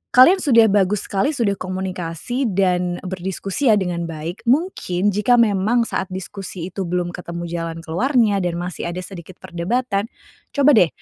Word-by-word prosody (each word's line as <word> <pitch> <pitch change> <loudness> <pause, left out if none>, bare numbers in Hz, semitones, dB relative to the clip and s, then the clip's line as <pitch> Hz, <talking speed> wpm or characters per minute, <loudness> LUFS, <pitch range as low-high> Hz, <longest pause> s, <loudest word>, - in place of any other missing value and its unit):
kalian 300 +10 +8
sudah 230 - +5
bagus 200 0 +2
sekali 270 +10 +1
sudah 200 -6 0
komunikasi 185 - -3
dan 180 -3 0
berdiskusi 190 +6 -3
ya 220 - +6
dengan 175 -4 -2
baik, 165 +6 -7
mungkin 230 - +1
jika 210 +5 +3
memang 230 +1 +3
saat 195 - -2
diskusi 185 -1 -7
itu 190 0 -4
belum 175 0 -1
ketemu 170 -1 -6
jalan 165 -1 -4
keluarnya 215 - +2
dan 175 -2 -1
masih 175 0 -4
ada 180 +2 -4
sedikit 180 -1 -10
perdebatan, 200 +4 -1 0.5
coba 285 0 +5
deh 215 - +6
190 Hz, 155 wpm, -20 LUFS, 175-230 Hz, 0.5 s, kalian